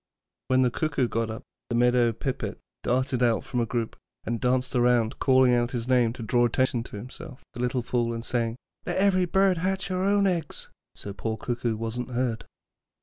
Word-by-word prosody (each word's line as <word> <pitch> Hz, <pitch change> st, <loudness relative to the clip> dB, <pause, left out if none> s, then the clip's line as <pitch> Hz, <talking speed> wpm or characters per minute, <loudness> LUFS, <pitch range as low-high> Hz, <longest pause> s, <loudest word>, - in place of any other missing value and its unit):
When 130 Hz, 0 st, +4 dB
the 125 Hz, -, +2 dB
Cuckoo 145 Hz, -2 st, 0 dB
got 115 Hz, -1 st, -1 dB
up, 110 Hz, +4 st, -6 dB, 0.3 s
the 120 Hz, -, -1 dB
Meadow 120 Hz, 0 st, +4 dB
Pipit 125 Hz, +4 st, -4 dB, 0.2 s
darted 130 Hz, 0 st, 0 dB
out 120 Hz, -2 st, +2 dB
from 125 Hz, -, -3 dB
a 115 Hz, -, 0 dB
group 115 Hz, -1 st, -2 dB, 0.3 s
and 115 Hz, 0 st, -3 dB
danced 130 Hz, +1 st, +1 dB
round, 120 Hz, -2 st, +2 dB
calling 130 Hz, -2 st, +5 dB
out 120 Hz, -1 st, +2 dB
his 120 Hz, -1 st, -3 dB
name 125 Hz, -3 st, +3 dB
to 120 Hz, -, -7 dB
draw 120 Hz, +2 st, +2 dB
attention 120 Hz, 0 st, +1 dB
to -, -, -9 dB
himself, 130 Hz, +5 st, -10 dB
the -, -, -9 dB
little 125 Hz, 0 st, 0 dB
fool, 120 Hz, -1 st, 0 dB
and 115 Hz, 0 st, -5 dB
saying, 115 Hz, -2 st, -1 dB, 0.3 s
'Let 175 Hz, -, -2 dB
every 190 Hz, -2 st, +3 dB
bird 190 Hz, 0 st, +3 dB
hatch 190 Hz, +2 st, -1 dB
her 185 Hz, 0 st, -1 dB
own 200 Hz, 0 st, +3 dB
eggs,' 170 Hz, -5 st, -2 dB, 0.3 s
so 100 Hz, -, -7 dB
poor 110 Hz, +2 st, -3 dB
Cuckoo 120 Hz, -1 st, -2 dB
wasn't 115 Hz, +3 st, -4 dB
heard. 120 Hz, -2 st, -2 dB
125 Hz, 195 wpm, -26 LUFS, 115-130 Hz, 0.3 s, calling